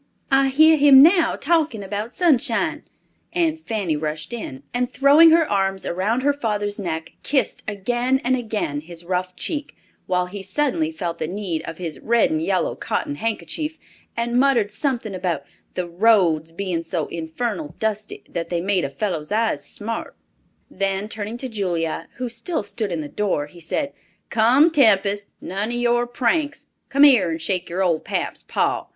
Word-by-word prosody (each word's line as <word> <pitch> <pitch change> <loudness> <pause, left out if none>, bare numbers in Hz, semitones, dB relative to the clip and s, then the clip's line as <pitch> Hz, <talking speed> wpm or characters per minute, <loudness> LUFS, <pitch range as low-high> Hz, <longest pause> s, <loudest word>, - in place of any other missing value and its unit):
I 270 0 +5
hear 315 +4 +6
him 280 -2 +8
now 340 +1 +5
talking 310 -9 +1
about 210 +4 -5
Sunshine," 330 -9 +1 0.5
and 330 -2 +1
Fanny 210 - -2
rushed 155 +7 -4
in, 140 - -6
and 245 0 0
throwing 280 +5 +6
her 325 -1 +4
arms 195 -1 0
around 210 +8 0
her 285 +1 +3
father's 210 -6 -2
neck, 160 -4 -4
kissed 270 -5 0
again 240 +6 0
and 255 +1 +2
again 215 - -2
his 170 +1 -8
rough 180 0 -2
cheek, 295 - -4 0.3
while 180 -1 +1
he 195 +2 -7
suddenly 295 - 0
felt 175 - -4
the - - -2
need 180 -3 -3
of 165 - -6
his 170 -4 -5
red 235 +5 +2
and 315 0 0
yellow - - 0
cotton 290 - -2
handkerchief, 300 +6 -3 0.4
and 235 +1 +1
muttered 250 -6 +3
something 235 -4 -2
about 180 -2 -2 0.3
the 180 - -1
"roads" 170 -4 +3
being 175 -1 -2
so 165 -1 -2
infernal 165 0 -4
dusty 215 -1 -3
that 165 -1 -4
they 175 - -1
made 185 +1 +1
a 140 - -1
fellow's 170 -2 -3
eyes 220 +1 +1
smart! 225 +2 -5 0.5
Then 195 +1 -2
turning 215 +1 -5
to 260 - -4
Julia, 175 -8 -2
who 250 0 -3
still 275 - -3
stood 205 0 -4
in 165 -2 -2
the 150 - -5
door, 185 -4 -1
he 160 +4 -15
said, 280 - -2 0.4
"Come, 255 +9 +5
Tempest, 205 -8 +3
none 200 +4 -3
of 240 - -3
your 240 0 +1
pranks! 285 +5 0 0.2
Come 280 +1 +4
here 245 -12 +6
and 165 0 -3
shake 180 +2 -2
your 185 +3 -1
old 170 -4 +1
pap's - - -3
paw. - - -1
210 Hz, 170 wpm, -22 LUFS, 180-265 Hz, 0.5 s, him